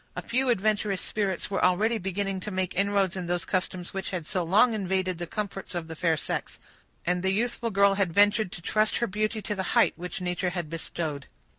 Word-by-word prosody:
A - - -3
few 260 +2 +1
adventurous 210 -3 +1
spirits 200 -2 -2
were 195 - 0
already 215 +6 +3
beginning 195 +1 -2
to 200 - -5
make 185 -2 -2
inroads 200 -1 +1
in 180 -2 -4
those 175 -3 -1
customs 185 0 -2
which 195 -1 -3
had 180 -4 -4
so 180 - -1
long 210 +8 +4
invaded 190 -3 -1
the 175 - -3
comforts 195 -1 -5
of 170 -2 -3
the 160 - -7
fair 165 -1 +1
sex; - - -3 0.5
and 180 0 +1
the 190 - +1
youthful 230 +3 0
girl 200 -1 +4
had 195 -3 +1
ventured 205 +1 +4
to 170 - -8
trust 215 +3 +2
her 235 - +1
beauty 215 +1 -1
to 210 - -2
the 195 - -2 0.2
height - - +5
which 180 +1 -5
nature 180 0 -1
had 175 -3 -4
bestowed. 160 -3 -4
190 Hz, 210 wpm, -27 LUFS, 180-205 Hz, 0.5 s, height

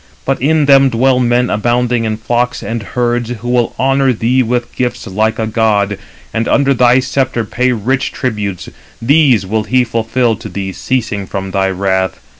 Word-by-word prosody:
But 135 -2 -1
in 155 +2 +2
them 135 -1 +5
dwell 125 +2 +2
men 125 0 +1
abounding 120 +2 0
in 110 -1 -2
flocks 120 +2 -1
and 115 0 -3
herds, 120 +3 -1
who 120 0 -5
will 120 -1 0
honour 135 0 +2
thee 125 +3 +1
with 120 0 -2
gifts 120 -1 -2
like 110 +3 -1
a 110 - -1
god, 105 -3 0 0.3
and 115 +1 -1
under 140 -1 +3
thy 125 0 +4
sceptre 130 -3 -1
pay 125 +4 0
rich 125 +4 -1
tributes. 105 -7 -3 0.3
These 130 -5 +3
will 110 +2 -1
he 130 +2 +2
fulfil 115 0 0
to - - -9
thee 95 -1 -4
ceasing 110 -3 -2
from 95 0 -5
thy 95 0 +1
wrath. 95 -1 -1
120 Hz, 175 wpm, -14 LUFS, 110-125 Hz, 0.3 s, them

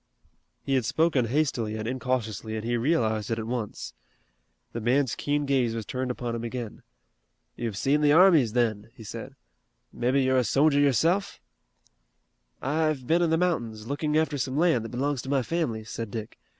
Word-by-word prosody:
He 135 - -1
had 130 -2 +2
spoken 145 +1 +2
hastily 120 -4 0
and 110 0 -4
incautiously 115 -4 -2
and 110 0 -4
he 120 +1 0
realized 115 -5 0
it 115 - -1
at 110 - -4
once. 115 - -4 0.8
The 115 - -4
man's 125 +1 +2
keen 145 +3 -1
gaze 130 -5 +1
was 115 -2 -4
turned 130 +2 -3
upon 120 -1 -3
him 115 0 -4
again. 120 -2 -5 0.7
"You've 115 -4 -4
seen 145 +6 +2
the 145 -1 +4
armies, 160 - +6
then?" 110 -3 0
he 110 - -11
said. 105 - -8 0.6
"Mebbe 125 +2 0
you're 130 -1 +3
a - - +2
sojer 140 +6 +3
yourself?" 160 - +2 1.2
"I've 150 -1 0
been 165 +6 +2
in 170 - +2
the 160 - +2
mountains, 120 -12 -1
looking 150 +4 -1
after 155 -2 0
some 130 +2 -2
land 160 -9 +2
that - - -6
belongs 135 +1 -1
to 130 - -8
my 135 -2 +2
family," 125 -9 -2
said 115 +1 -6
Dick. 110 0 -7
130 Hz, 175 wpm, -27 LUFS, 115-145 Hz, 1.2 s, armies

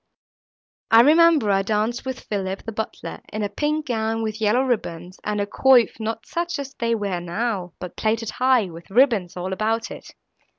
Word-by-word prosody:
I 225 0 +8
remember 310 -4 +5
I 195 0 +3
danced 215 +4 -1
with 260 -1 -4
Philip, 195 -2 -4
the 225 - -5
butler, 220 0 -6
in 215 0 -3
a 205 - -1
pink 300 +8 -1
gown, 225 -2 -1
with 220 0 -4
yellow 220 +5 +3
ribbons, 185 -8 -3
and 210 0 -2
a 200 - 0
coif, 245 +3 +4
not 225 0 -4
such 345 0 -3
as 280 -1 -6
they 230 0 0
wear 200 -5 -2
now, 180 0 -3
but 180 -2 -8
plaited 220 0 -1
high, 255 -3 +3
with 165 +1 -12
ribbons 215 -6 +2
all 185 +1 -3
about 225 +3 -1
it. - - -11
220 Hz, 180 wpm, -23 LUFS, 200-245 Hz, -, I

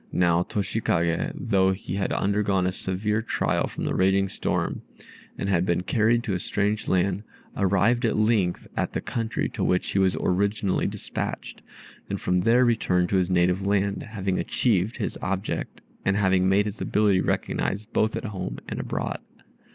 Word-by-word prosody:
Now 85 -1 +3
Toshikagè, 90 - 0
though 100 -10 +2
he 95 -2 -6
had 100 0 -1
undergone 100 -2 +1
a 90 - +1
severe 105 +4 -1
trial 115 - 0
from - - -6
the - - -1
raging 95 +1 +2
storm, - - -2 0.6
and - - -3
had 90 -3 +2
been 90 -1 0
carried 115 +4 +2
to 105 - -2
a 90 - -1
strange 105 +3 -1
country, 95 +1 +1 0.3
arrived 100 +5 +2
at 115 - +1
length 105 -5 +1
at - - -1
the - - -1
country 115 -2 -2
to - - -3
which 90 - +1
he 95 - +1
was 95 -1 +2
originally 100 +1 +1
despatched, - - -5 0.5
and - - -2
from 90 0 +1
there 120 +6 +4
returned 90 -7 +2
to 100 - +2
his 90 -1 +1
native 90 +2 +2
land, 100 0 +1
having 95 -4 -2
achieved 110 -2 +1
his - - -3
object, 95 +2 -3 0.2
and 100 +1 +1
having 95 -2 +3
made 100 +2 +3
his 105 0 -5
ability 105 -3 +2
recognized 105 +4 -2
both 110 0 +2
at - - -4
home 105 -4 -4
and - - -4
abroad. - - -3
100 Hz, 170 wpm, -25 LUFS, 90-105 Hz, 0.6 s, there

